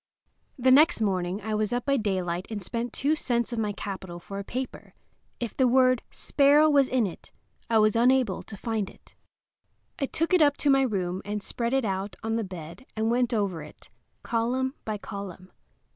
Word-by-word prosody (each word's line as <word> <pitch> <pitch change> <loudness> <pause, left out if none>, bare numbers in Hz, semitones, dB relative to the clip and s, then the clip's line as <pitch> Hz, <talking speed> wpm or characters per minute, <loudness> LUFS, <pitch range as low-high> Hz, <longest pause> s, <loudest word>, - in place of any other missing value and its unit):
The 260 0 +3
next 305 +4 +6
morning 190 -2 -1
I 220 0 -2
was 215 -1 0
up 245 0 -1
by 275 - +2
daylight 185 -5 -2
and 220 -2 -4
spent 230 +5 -4
two 290 +6 +1
cents 240 -5 -1
of 235 - -2
my 210 -2 0
capital 190 -3 -6
for 195 +3 -7
a - - -4
paper. 255 +5 -6 0.4
If 235 -2 -4
the 260 - +3
word 255 0 +4
"sparrow" 290 +2 +4
was 280 -2 +5
in 255 -3 +2
it 180 - -8 0.4
I 225 - +4
was 215 0 +4
unable 245 -3 +3
to 210 - -10
find 220 -2 -2
it. - - -20 0.9
I 275 - 0
took 330 +6 -1
it 365 - +5
up 290 -1 +4
to 285 - +3
my 270 0 +5
room 190 -7 -1
and 205 0 -4
spread 235 +4 -2
it 270 -3 +2
out 195 -1 -3
on 225 0 -1
the 230 - 0
bed 175 +2 -9
and 220 +1 0
went 245 0 +2
over 200 -7 -1
it, 150 - -14 0.3
column 250 +3 0
by 215 -1 -2
column. 195 -3 -8
225 Hz, 195 wpm, -27 LUFS, 195-255 Hz, 0.9 s, next